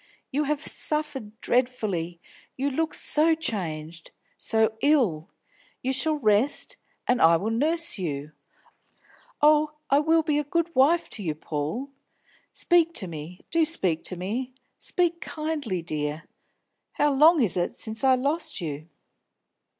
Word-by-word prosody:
You 295 Hz, +3 st, 0 dB
have 300 Hz, +1 st, -1 dB
suffered 275 Hz, -8 st, -2 dB
dreadfully; 210 Hz, -9 st, -1 dB, 0.4 s
you 280 Hz, +2 st, 0 dB
look 320 Hz, +4 st, -1 dB
so 320 Hz, +2 st, +3 dB
changed, 170 Hz, -, -4 dB, 0.3 s
so 220 Hz, -1 st, +1 dB
ill. 230 Hz, -, +2 dB, 0.5 s
You 260 Hz, +1 st, 0 dB
shall 305 Hz, +4 st, +2 dB
rest, 260 Hz, -, +1 dB, 0.3 s
and 250 Hz, -, +2 dB
I 165 Hz, +1 st, +6 dB
will 205 Hz, +7 st, -2 dB
nurse 310 Hz, +2 st, 0 dB
you. 150 Hz, -4 st, -4 dB, 1.1 s
Oh, 300 Hz, 0 st, +5 dB, 0.2 s
I 280 Hz, -, +6 dB
will 320 Hz, +2 st, +3 dB
be 300 Hz, -2 st, +1 dB
a -, -, -1 dB
good 335 Hz, +3 st, -1 dB
wife 315 Hz, +6 st, +3 dB
to 215 Hz, -, -5 dB
you, 155 Hz, -4 st, -2 dB
Paul. 155 Hz, -, -4 dB, 0.6 s
Speak 335 Hz, -1 st, +2 dB
to 195 Hz, -, -1 dB
me, 165 Hz, +2 st, -8 dB
do 330 Hz, 0 st, +3 dB
speak 190 Hz, -, +2 dB
to 185 Hz, -, -1 dB
me: 235 Hz, +8 st, -4 dB, 0.2 s
speak 345 Hz, -1 st, 0 dB
kindly, 300 Hz, -, -3 dB
dear! 150 Hz, -1 st, -3 dB, 0.7 s
How 295 Hz, 0 st, +2 dB
long 310 Hz, +4 st, +6 dB
is 200 Hz, -, +2 dB
it 175 Hz, -1 st, -1 dB
since 220 Hz, +3 st, -3 dB
I 265 Hz, -1 st, +5 dB
lost 285 Hz, +6 st, -2 dB
you?" 155 Hz, -2 st, -6 dB
255 Hz, 140 wpm, -26 LUFS, -, 1.1 s, I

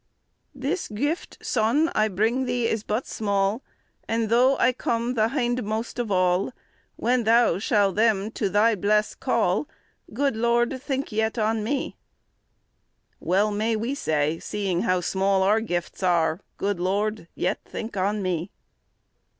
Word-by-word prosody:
"This 280 Hz, +8 st, -2 dB
gueifte, 290 Hz, +10 st, -3 dB
Sonne, 255 Hz, +10 st, +2 dB
I 215 Hz, 0 st, +2 dB
bringe 225 Hz, +6 st, 0 dB
Thee 245 Hz, -1 st, 0 dB
is 220 Hz, -, -1 dB
but 215 Hz, +4 st, -2 dB
small, 200 Hz, +2 st, 0 dB, 0.5 s
And 225 Hz, -1 st, 0 dB
though 255 Hz, +4 st, +4 dB
I 255 Hz, -, +3 dB
come 235 Hz, 0 st, -1 dB
the 220 Hz, -3 st, +2 dB
hyndmoste 240 Hz, -3 st, -2 dB
of 240 Hz, -3 st, -2 dB
all, 185 Hz, +3 st, +1 dB, 0.4 s
When 245 Hz, 0 st, +1 dB
Thou 225 Hz, -5 st, +4 dB
shall 205 Hz, -2 st, +2 dB
them 215 Hz, -1 st, +2 dB
to 205 Hz, -3 st, -1 dB
Thy 210 Hz, +4 st, +4 dB
blesse 210 Hz, +1 st, +1 dB
call, -, -, 0 dB, 0.4 s
Good 275 Hz, +2 st, 0 dB
Lorde, 235 Hz, +1 st, +2 dB
yet 260 Hz, -, -7 dB
thinke 240 Hz, -6 st, -2 dB
on 220 Hz, 0 st, 0 dB
me." 270 Hz, +5 st, -2 dB, 1.2 s
Well 200 Hz, +4 st, +1 dB
may 220 Hz, +2 st, 0 dB
we 230 Hz, +5 st, -2 dB
say, 155 Hz, -, 0 dB
seeing 195 Hz, -4 st, -2 dB
how 185 Hz, 0 st, +1 dB
small 190 Hz, +2 st, +1 dB
our 210 Hz, +3 st, +3 dB
gifts 175 Hz, -6 st, -4 dB
are, 170 Hz, -1 st, +2 dB, 0.2 s
"Good 200 Hz, -2 st, -1 dB
Lord, 200 Hz, +1 st, -1 dB
yet 185 Hz, +3 st, -1 dB
think 225 Hz, 0 st, -7 dB
on 200 Hz, +2 st, 0 dB
me." 180 Hz, 0 st, -2 dB
215 Hz, 145 wpm, -25 LUFS, 195-235 Hz, 1.2 s, though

